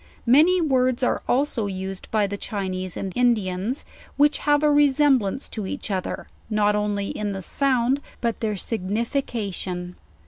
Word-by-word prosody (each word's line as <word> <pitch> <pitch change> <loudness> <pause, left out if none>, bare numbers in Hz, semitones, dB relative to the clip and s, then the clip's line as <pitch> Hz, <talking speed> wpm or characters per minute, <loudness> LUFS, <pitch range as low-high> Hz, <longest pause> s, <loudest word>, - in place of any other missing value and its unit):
Many 310 +9 +5
words 255 -4 +2
are - - +1
alpo 245 -6 +1
used 190 0 -6
by 215 -2 +2
the 200 0 -3
Chinese 185 -3 -4
and 190 -2 -4
Indiana, 215 -5 +1 0.5
which 290 +1 +4
have 290 0 +2
a 300 - +5
resemblance 280 -5 +3
to 210 -4 -4
each 210 - -5
other, 185 -2 -3 0.2
not 210 -1 +2
only 205 -1 -1
in 205 -1 -3
the 190 -1 -5
sound, 265 +3 +1 0.2
but 235 -1 -1
their 215 -2 -1
signification. 200 -4 -3
220 Hz, 145 wpm, -24 LUFS, 195-265 Hz, 0.5 s, Many